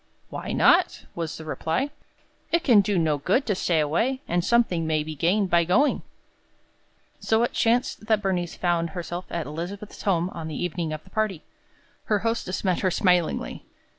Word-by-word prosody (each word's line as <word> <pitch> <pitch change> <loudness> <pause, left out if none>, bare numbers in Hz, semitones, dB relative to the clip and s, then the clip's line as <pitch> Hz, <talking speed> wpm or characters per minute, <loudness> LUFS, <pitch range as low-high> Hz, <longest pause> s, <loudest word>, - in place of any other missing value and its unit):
"Why - - -5
not?" - - +3
was 165 -2 -4
the 160 - -9
reply. 165 - -2 0.6
"It 340 0 +2
can 235 -9 +6
do 200 0 0
no 155 -3 +1
good 200 - +1
to 210 - +1
stay 175 -3 +1
away, 225 - 0
and 175 0 0
something 185 -7 +2
may 155 -1 +1
be 155 +1 -6
gained 180 +6 +1
by 170 0 +5
going." 210 - +2 1.2
So 225 +1 +2
it 240 - -1
chanced 230 -1 +1
that 220 -2 +3
Bernice 180 -4 -2
found 170 -2 0
herself 175 +1 -5
at 170 -2 -3
Elizabeth's 175 +7 -7
home 180 -2 +1
on 165 -2 -6
the 155 - -5
evening 170 -2 -2
of 155 0 -5
the - - -20
party. 215 -7 -1 0.6
Her 210 - +2
hostess 225 -5 -1
met 185 -3 +1
her 185 - +1
smilingly. 180 -3 +1
180 Hz, 175 wpm, -25 LUFS, 165-215 Hz, 1.2 s, can